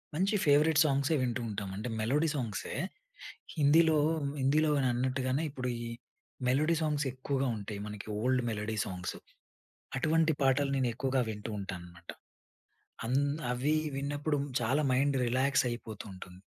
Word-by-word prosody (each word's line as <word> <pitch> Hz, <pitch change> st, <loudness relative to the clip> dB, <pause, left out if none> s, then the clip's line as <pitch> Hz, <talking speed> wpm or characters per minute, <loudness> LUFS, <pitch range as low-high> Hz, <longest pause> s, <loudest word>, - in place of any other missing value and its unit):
మంచి 195 Hz, +6 st, +2 dB
ఫేవరెట్ 150 Hz, +1 st, +5 dB
సాంగ్సే 140 Hz, +2 st, +2 dB
వింటూ 120 Hz, -1 st, -1 dB
ఉంటాం. 100 Hz, -2 st, -4 dB
అంటే 110 Hz, +5 st, -4 dB
మెలోడీ 145 Hz, +9 st, +2 dB
సాంగ్సే 115 Hz, -8 st, -3 dB, 0.8 s
హిందీలో 155 Hz, +2 st, +5 dB, 0.4 s
హిందీలో 150 Hz, +4 st, +3 dB
అని 130 Hz, -, +2 dB
అన్నట్టుగానే 130 Hz, +3 st, 0 dB
ఇప్పుడు 130 Hz, -3 st, -3 dB
ఈ 120 Hz, -, -4 dB, 0.6 s
మెలోడీ 150 Hz, +6 st, +3 dB
సాంగ్స్ 150 Hz, -2 st, 0 dB
ఎక్కువగా 135 Hz, +1 st, -1 dB
ఉంటాయి. 100 Hz, 0 st, -6 dB
మనకి 105 Hz, -1 st, -7 dB
ఓల్డ్ 130 Hz, +1 st, +2 dB
మెలోడీ 110 Hz, 0 st, -3 dB
సాంగ్సు. 90 Hz, -1 st, -5 dB, 0.8 s
అటువంటి 160 Hz, +3 st, +3 dB
పాటలు 135 Hz, +1 st, +3 dB
నేను 130 Hz, -2 st, +1 dB
ఎక్కువగా 130 Hz, +2 st, 0 dB
వింటూ 105 Hz, +1 st, -5 dB
ఉంటానన్నమాట. 90 Hz, -3 st, -8 dB, 1.0 s
అంద్ 140 Hz, +3 st, +1 dB, 0.2 s
అవి 135 Hz, +5 st, +1 dB, 0.2 s
విన్నప్పుడు 145 Hz, +2 st, -1 dB, 0.2 s
చాలా 130 Hz, +6 st, +2 dB
మైండ్ 135 Hz, +2 st, +2 dB
రిలాక్స్ 130 Hz, +2 st, +2 dB
అయిపోతూ 115 Hz, -3 st, -6 dB
ఉంటుంది. 90 Hz, 0 st, -11 dB
130 Hz, 130 wpm, -31 LUFS, 115-145 Hz, 1.0 s, ఫేవరెట్